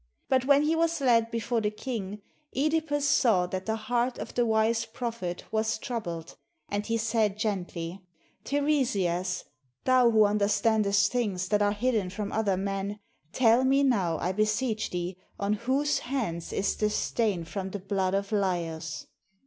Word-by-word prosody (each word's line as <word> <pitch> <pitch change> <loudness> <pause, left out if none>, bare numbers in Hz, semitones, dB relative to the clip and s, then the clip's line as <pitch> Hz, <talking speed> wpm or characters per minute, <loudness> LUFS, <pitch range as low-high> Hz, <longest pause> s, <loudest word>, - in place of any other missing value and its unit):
But 260 -1 +3
when 285 +1 +5
he 315 +2 +2
was 330 0 +1
led 230 -4 +3
before 230 0 -1
the 210 - +1
king, 210 -3 -5 0.3
(Edipus 300 +1 +1
saw 215 -10 +4
that 185 +2 -5
the 220 - +1
heart 240 +3 -1
of - - -6
the 240 -1 +1
wise 220 +1 +2
prophet 230 -6 -5
was 220 0 0
troubled, 175 -9 -5 0.3
and 205 0 -1
he 230 0 +1
said 220 -2 +1
gently, 185 -4 -3 0.4
"Teiresias, 205 - 0 0.4
thou 240 -4 +5
under 205 0 +2
standest 205 -1 +2
things 200 -7 -1
that 210 -1 +2
are 205 0 +3
hidden 215 -3 0
from 200 +2 -4
other 205 -4 +1
men; 195 +1 -3 0.3
tell 240 0 +4
me 270 +2 +3
now, 190 -11 +2
I 180 - -1
beseech 215 +3 0
thee, 180 +1 -4 0.2
on 200 +1 +1
whose 265 +7 +1
hands 225 -11 -3
is 195 - 0
the 210 - +1
stain 210 -4 0
from 190 +3 -5
GREECE - - -13
the 205 - -3
blood 195 -2 +1
of 200 0 -1
Laios. 170 -6 -2
215 Hz, 160 wpm, -28 LUFS, 195-240 Hz, 0.4 s, when